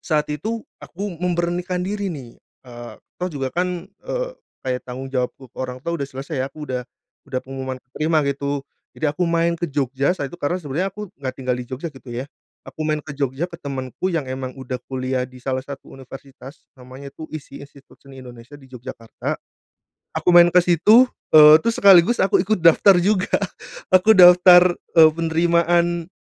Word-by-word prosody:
saat 155 Hz, -2 st, -1 dB
itu 220 Hz, +10 st, -4 dB, 0.2 s
aku 200 Hz, +2 st, -6 dB
memberanikan 180 Hz, 0 st, -2 dB
diri 200 Hz, +1 st, -3 dB
nih, 135 Hz, -9 st, -9 dB, 0.2 s
eee, 120 Hz, -1 st, -10 dB, 0.3 s
toh 180 Hz, -, -1 dB
juga 135 Hz, -5 st, -5 dB
kan, 180 Hz, 0 st, -2 dB
eee, -, -, -6 dB, 0.3 s
kayak 125 Hz, -1 st, -2 dB
tanggung 130 Hz, +1 st, -8 dB
jawabku 130 Hz, +1 st, -3 dB
ke -, -, -41 dB
orang 125 Hz, -1 st, -4 dB
tua 170 Hz, -, -2 dB
udah 140 Hz, -4 st, -4 dB
selesai 135 Hz, +1 st, -6 dB
ya 135 Hz, -, -3 dB
aku 150 Hz, +1 st, -9 dB
udah 125 Hz, -2 st, -3 dB, 0.5 s
udah 130 Hz, -, -2 dB
pengumuman 130 Hz, 0 st, -6 dB
keterima 155 Hz, +6 st, -1 dB
gitu 140 Hz, 0 st, -3 dB, 0.3 s
jadi 150 Hz, -1 st, -1 dB
aku 180 Hz, -, -2 dB
main 170 Hz, 0 st, +1 dB
ke 170 Hz, -, -13 dB
Jogja 140 Hz, 0 st, 0 dB
saat 175 Hz, -6 st, -2 dB
itu 135 Hz, -, -11 dB
karena 175 Hz, +6 st, -1 dB
sebenernya 170 Hz, +4 st, -3 dB
aku 210 Hz, +2 st, -8 dB
nggak 130 Hz, -2 st, -6 dB
tinggal 130 Hz, -1 st, -1 dB
di 125 Hz, -, -5 dB
Jogja 130 Hz, +6 st, -5 dB
gitu 135 Hz, -1 st, -15 dB
ya, 120 Hz, +2 st, -4 dB, 0.4 s
aku -, -, -12 dB
main 155 Hz, 0 st, 0 dB
ke 145 Hz, -, -8 dB
Jogja 140 Hz, +2 st, -2 dB
ke 175 Hz, -, -14 dB
temenku 135 Hz, +4 st, -4 dB
yang 165 Hz, -5 st, -1 dB
emang 130 Hz, 0 st, -6 dB
udah 130 Hz, -1 st, -6 dB
kuliah 130 Hz, 0 st, -2 dB
di 130 Hz, -, -16 dB
salah 130 Hz, +1 st, -3 dB
satu 140 Hz, 0 st, -10 dB
universitas 135 Hz, +1 st, -13 dB
namanya 130 Hz, +2 st, -12 dB
tuh 155 Hz, -, -9 dB
ISI 145 Hz, -3 st, -9 dB
Institut 140 Hz, -1 st, -17 dB
Seni 135 Hz, -1 st, -14 dB
Indonesia 120 Hz, +3 st, -13 dB
di 140 Hz, -, -18 dB
Yogyakarta, 120 Hz, -2 st, -6 dB, 0.8 s
aku -, -, 0 dB
main 175 Hz, 0 st, +8 dB
ke 180 Hz, -, +6 dB
situ, 195 Hz, +8 st, +5 dB, 0.3 s
eee, 150 Hz, 0 st, +10 dB
terus 230 Hz, 0 st, +1 dB
sekaligus 195 Hz, +3 st, +6 dB
aku 195 Hz, -, +3 dB
ikut 215 Hz, -3 st, 0 dB
daftar 170 Hz, +4 st, +6 dB
juga 200 Hz, +1 st, 0 dB, 0.6 s
aku 185 Hz, +4 st, +6 dB
daftar, 180 Hz, 0 st, +8 dB, 0.2 s
eee, 160 Hz, -1 st, +8 dB
penerimaan, 170 Hz, +1 st, +1 dB
150 Hz, 180 wpm, -21 LUFS, 130-175 Hz, 0.8 s, eee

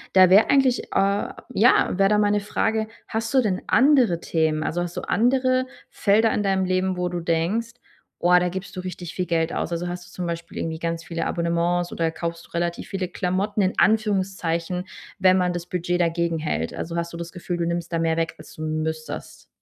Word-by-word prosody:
Da 185 Hz, -1 st, +8 dB
wäre 200 Hz, +4 st, +6 dB
eigentlich 270 Hz, -3 st, +3 dB
äh, 200 Hz, +1 st, +1 dB, 0.2 s
ja, -, -, +5 dB
wäre 195 Hz, 0 st, +4 dB
da 210 Hz, -, +3 dB
meine 205 Hz, 0 st, +3 dB
Frage, 220 Hz, +2 st, -1 dB, 0.2 s
hast 225 Hz, +3 st, -3 dB
du 265 Hz, -, +5 dB
denn 195 Hz, -6 st, -1 dB
andere 255 Hz, -, +4 dB
Themen? 160 Hz, -2 st, 0 dB
Also, 175 Hz, +3 st, -1 dB
hast 175 Hz, 0 st, -6 dB
du -, -, -3 dB
andere 255 Hz, +2 st, +2 dB, 0.2 s
Felder 220 Hz, +2 st, +3 dB
in 210 Hz, -, 0 dB
deinem 190 Hz, -1 st, +1 dB
Leben, 185 Hz, 0 st, 0 dB
wo 180 Hz, 0 st, -1 dB
du 175 Hz, 0 st, -3 dB
denkst, 170 Hz, +8 st, 0 dB, 0.5 s
oah, 180 Hz, +1 st, +5 dB
da 180 Hz, 0 st, 0 dB
gibst 190 Hz, +2 st, -7 dB
du 185 Hz, -, -4 dB
richtig 180 Hz, -2 st, -7 dB
viel 180 Hz, -, -1 dB
Geld 165 Hz, -1 st, 0 dB
aus? -, -, -2 dB
Also, 170 Hz, +1 st, -2 dB
hast 175 Hz, 0 st, -5 dB
du 180 Hz, -, -17 dB
zum 180 Hz, -1 st, -4 dB
Beispiel 170 Hz, 0 st, -5 dB
irgendwie 160 Hz, -1 st, -3 dB
ganz 165 Hz, 0 st, -3 dB
viele 165 Hz, 0 st, -3 dB
Abonnements 170 Hz, +1 st, 0 dB
oder 165 Hz, -1 st, -1 dB
kaufst 170 Hz, 0 st, -5 dB
du -, -, -23 dB
relativ 170 Hz, 0 st, -2 dB
viele 190 Hz, -2 st, -2 dB
Klamotten 195 Hz, +3 st, -1 dB
in 185 Hz, -, +1 dB
Anführungszeichen, 190 Hz, -5 st, +1 dB, 0.3 s
wenn 185 Hz, -1 st, +5 dB
man 180 Hz, -1 st, +1 dB
das 175 Hz, -1 st, -4 dB
Budget 180 Hz, 0 st, -2 dB
dagegenhält? 165 Hz, -, -1 dB
Also, 165 Hz, +1 st, -5 dB
hast 170 Hz, 0 st, -2 dB
du 170 Hz, -, -7 dB
das 170 Hz, 0 st, -6 dB
Gefühl, 175 Hz, -1 st, -4 dB
du 170 Hz, -, -1 dB
nimmst 170 Hz, 0 st, -3 dB
da 165 Hz, -, 0 dB
mehr 165 Hz, -1 st, +1 dB
weg, 165 Hz, 0 st, -1 dB
als -, -, -13 dB
du 155 Hz, -, -10 dB
müsstest? 155 Hz, 0 st, -4 dB
180 Hz, 210 wpm, -24 LUFS, 170-195 Hz, 0.5 s, Da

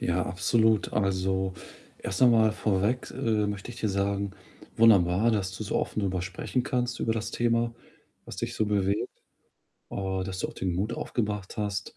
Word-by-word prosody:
Ja, 90 Hz, +1 st, +1 dB
absolut. 110 Hz, +4 st, +2 dB
Also, 95 Hz, -1 st, 0 dB, 0.4 s
erst 95 Hz, -, -4 dB
noch 125 Hz, -, +8 dB
mal 110 Hz, -2 st, +5 dB
vorweg, 105 Hz, +3 st, 0 dB
äh, 110 Hz, -2 st, 0 dB
möchte 100 Hz, +3 st, -5 dB
ich 120 Hz, -, -10 dB
dir 110 Hz, -, +1 dB
sagen, 100 Hz, 0 st, 0 dB, 0.5 s
wunderbar, 105 Hz, -1 st, +5 dB
dass 95 Hz, -3 st, -1 dB
du 110 Hz, -, -5 dB
so -, -, -4 dB
offen -, -, -1 dB
drüber 95 Hz, -3 st, -1 dB
sprechen 95 Hz, +7 st, -2 dB
kannst 125 Hz, -2 st, -1 dB
über 115 Hz, -, +1 dB
das 115 Hz, 0 st, -3 dB
Thema, 115 Hz, 0 st, +1 dB, 0.5 s
was -, -, -9 dB
dich -, -, -3 dB
so 110 Hz, -, +1 dB
bewegt, 100 Hz, -1 st, +1 dB, 0.8 s
äh, 95 Hz, -1 st, -2 dB
dass 95 Hz, 0 st, -5 dB
du -, -, -1 dB
auch -, -, -8 dB
den 90 Hz, -2 st, -2 dB
Mut 105 Hz, +5 st, -1 dB
aufgebracht 105 Hz, -6 st, -3 dB
hast, 100 Hz, -3 st, -3 dB
105 Hz, 175 wpm, -28 LUFS, 95-115 Hz, 0.8 s, noch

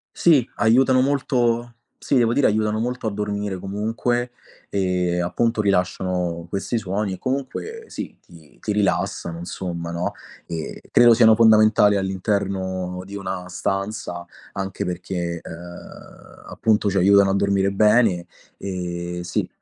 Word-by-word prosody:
Sì, 145 Hz, -8 st, +4 dB
aiutano 130 Hz, +4 st, +4 dB
molto 120 Hz, -4 st, 0 dB, 0.3 s
sì, -, -, -1 dB
devo 120 Hz, -3 st, +4 dB
dire, 140 Hz, +1 st, +2 dB
aiutano 110 Hz, 0 st, +1 dB
molto 125 Hz, 0 st, -2 dB
a 110 Hz, -, -1 dB
dormire. 105 Hz, -1 st, -3 dB
Comunque, 115 Hz, +5 st, -2 dB, 0.4 s
ehm, 90 Hz, -2 st, 0 dB
appunto, 115 Hz, +5 st, 0 dB
rilasciano 90 Hz, -3 st, -1 dB
questi 100 Hz, +6 st, -2 dB
suoni 100 Hz, -1 st, -2 dB
e -, -, -6 dB
comunque 140 Hz, -, -4 dB
sì, -, -, -7 dB
ti 80 Hz, -4 st, -18 dB
ti -, -, -3 dB
rilassano, 95 Hz, -4 st, -1 dB
insomma, 85 Hz, -1 st, -5 dB
no, 85 Hz, +1 st, -2 dB, 0.3 s
e 80 Hz, -2 st, -6 dB
credo 120 Hz, -1 st, +7 dB
siano 110 Hz, -1 st, +6 dB
fondamentali 110 Hz, -2 st, +5 dB
all'interno 95 Hz, -1 st, -2 dB
di 100 Hz, +2 st, -9 dB
una 95 Hz, -2 st, -5 dB
stanza, 95 Hz, -1 st, -3 dB, 0.3 s
anche 95 Hz, -1 st, -4 dB
perché, 90 Hz, -1 st, -3 dB
ehm, 85 Hz, +1 st, -12 dB
appunto, 105 Hz, -2 st, +1 dB
ci 100 Hz, -, -1 dB
aiutano 100 Hz, +1 st, +5 dB
a -, -, +1 dB
dormire 100 Hz, 0 st, +2 dB
bene. 105 Hz, -3 st, +3 dB, 0.3 s
Ehm, 90 Hz, -2 st, -4 dB
sì, 90 Hz, 0 st, -2 dB
100 Hz, 130 wpm, -22 LUFS, 90-110 Hz, 0.4 s, credo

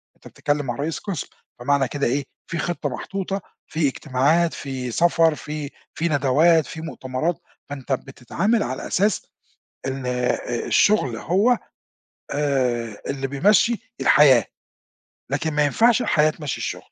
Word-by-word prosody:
أنت -, -, -15 dB
بتتكلم 145 Hz, -1 st, -2 dB
مع 120 Hz, -, -3 dB
رئيس 150 Hz, +5 st, -3 dB
قسم، 190 Hz, -9 st, -4 dB, 0.3 s
فمعنى 135 Hz, +1 st, +2 dB
كده 145 Hz, +1 st, -1 dB
إيه، 135 Hz, +3 st, 0 dB, 0.2 s
في 170 Hz, -, -4 dB
خطة 170 Hz, -4 st, -2 dB
محطوطة، 195 Hz, +7 st, -4 dB, 0.3 s
في 155 Hz, -2 st, 0 dB
إجتماعات، 150 Hz, +5 st, +1 dB
في 130 Hz, -3 st, -5 dB
سفر 165 Hz, +2 st, +3 dB
في 150 Hz, -1 st, -6 dB, 0.2 s
في 170 Hz, -, -1 dB
ندوات، 155 Hz, +4 st, +4 dB
في 160 Hz, -, -8 dB
مؤتمرات، 155 Hz, +1 st, -3 dB, 0.3 s
فأنت 140 Hz, -1 st, -7 dB
بتتعامل 170 Hz, -, -1 dB
على 130 Hz, -, -4 dB
أساس 205 Hz, +1 st, +1 dB, 0.6 s
إن 135 Hz, -1 st, -4 dB
آآ 125 Hz, -1 st, -1 dB
الشُّغل 140 Hz, -, +3 dB
هو 200 Hz, -, +2 dB, 0.7 s
آآ 125 Hz, -6 st, -1 dB
اللي 135 Hz, -1 st, -2 dB
بيمشّي 215 Hz, -, +2 dB
الحياة، 135 Hz, -5 st, +6 dB, 0.9 s
لكن 150 Hz, +3 st, -1 dB
ما 150 Hz, 0 st, +3 dB
ينفعش 235 Hz, -, +3 dB
الحياة 155 Hz, 0 st, +3 dB
تمشّي 150 Hz, -4 st, -5 dB
الشُّغل. -, -, -3 dB
145 Hz, 135 wpm, -23 LUFS, 130-170 Hz, 0.9 s, الحياة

